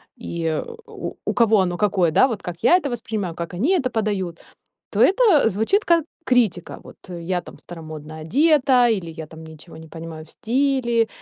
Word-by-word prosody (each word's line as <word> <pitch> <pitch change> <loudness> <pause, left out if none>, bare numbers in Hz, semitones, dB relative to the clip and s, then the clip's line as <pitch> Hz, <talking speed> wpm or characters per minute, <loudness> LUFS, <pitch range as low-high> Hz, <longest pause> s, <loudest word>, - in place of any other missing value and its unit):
и 170 -9 -3 0.2
у - - -7
у - - -1
кого 225 -3 +4
оно 175 -1 -1
какое, 190 -5 +2
да, 260 - +5
вот 230 -6 -4
как 175 -1 -6
я 350 - +6
это 295 -6 -3
воспринимаю, 215 -7 -4
как 170 0 -6
они 250 - 0
это 270 -9 +1
подают- 200 -7 -2 0.5
то - - 0
это 380 - +5
звучит 225 - +1
как 335 -2 +3 0.2
критика. 225 - 0
Вот - - -14
я 175 +1 -3
там - - -13
старомодно 155 -2 -10
одета, 260 - +3
или 190 -7 -1
я 160 -1 -8
там 160 +1 -13
ничего 160 +1 -13
не 160 0 -12
понимаю 160 -1 -9
в - - -17
стиле, 245 -2 0
205 Hz, 180 wpm, -22 LUFS, 165-250 Hz, 0.5 s, я